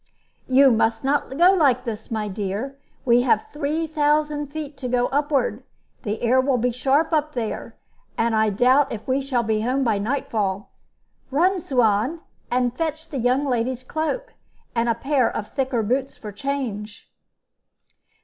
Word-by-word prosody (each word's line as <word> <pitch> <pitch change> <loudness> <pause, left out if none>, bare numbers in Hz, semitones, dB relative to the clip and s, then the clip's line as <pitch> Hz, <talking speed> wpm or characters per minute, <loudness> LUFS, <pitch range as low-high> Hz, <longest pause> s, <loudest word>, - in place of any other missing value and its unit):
"You 265 +1 +6
must 225 +1 +1
not 275 0 0
go 355 +3 +6
like 275 -8 +3
this, 225 -3 -6
my 215 -2 -2
dear. 205 +6 -4 0.3
We 240 -1 +5
have 240 -4 +2
three 300 +2 -1
thousand 300 -1 +1
feet 295 0 -6
to 265 -2 -4
go 245 0 +1
upward. 275 -5 0 0.4
The 210 +2 -4
air 255 +2 +4
will 260 -1 +1
be 245 +1 +1
sharp 275 +7 +1
up 305 -1 +1
there, 230 -3 -4 0.4
and 230 0 +1
I 220 0 +3
doubt 255 +7 +3
if 220 -2 -6
we 265 +1 +1
shall 260 -3 0
be 220 -1 0
home 255 +4 0
by 220 -5 +1
night 255 +7 -2
fall. 200 -2 -2 0.6
Run, 360 +8 +2
Suan, 250 +2 +1 0.3
and 245 -1 0
fetch 320 +1 -3
the 275 - -4
young 250 +4 +2
lady's 250 -1 -1
cloak, 315 - -3 0.4
and 235 0 +1
a 230 - +2
pair 265 0 +1
of 210 - -5
thicker 260 -4 0
boots 260 +5 -1
for 210 - -8
change." 220 -3 -4
255 Hz, 165 wpm, -23 LUFS, 230-285 Hz, 0.6 s, You